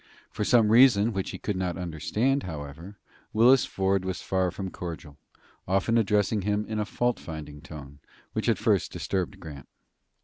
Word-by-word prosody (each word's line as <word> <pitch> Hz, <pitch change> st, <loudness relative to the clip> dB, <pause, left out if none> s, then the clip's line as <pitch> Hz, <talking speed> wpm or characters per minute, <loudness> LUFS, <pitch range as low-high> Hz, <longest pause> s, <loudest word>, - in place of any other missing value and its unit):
For -, -, -3 dB
some 115 Hz, -1 st, +4 dB
reason 115 Hz, -2 st, +6 dB
which 95 Hz, -1 st, -2 dB
he -, -, -6 dB
could 105 Hz, -, -3 dB
not 90 Hz, -2 st, -2 dB
understand, 105 Hz, -, -1 dB
however, 80 Hz, +4 st, -8 dB, 0.4 s
Willis 120 Hz, +4 st, +5 dB
Ford 95 Hz, 0 st, 0 dB
was 95 Hz, -1 st, -3 dB
far 95 Hz, -1 st, 0 dB
from 95 Hz, +1 st, -6 dB
cordial, 80 Hz, -4 st, -8 dB, 0.5 s
often 95 Hz, +5 st, +1 dB
addressing 105 Hz, -1 st, +2 dB
him 105 Hz, +2 st, -1 dB
in 110 Hz, 0 st, -3 dB
a 105 Hz, -, 0 dB
fault 120 Hz, +3 st, -1 dB
finding 75 Hz, -2 st, -8 dB
tone, 70 Hz, -3 st, -11 dB, 0.3 s
which -, -, -1 dB
at -, -, +3 dB
first -, -, +1 dB
disturbed 95 Hz, -2 st, -3 dB
Grant. 75 Hz, -6 st, -10 dB
95 Hz, 165 wpm, -27 LUFS, 80-105 Hz, 0.5 s, reason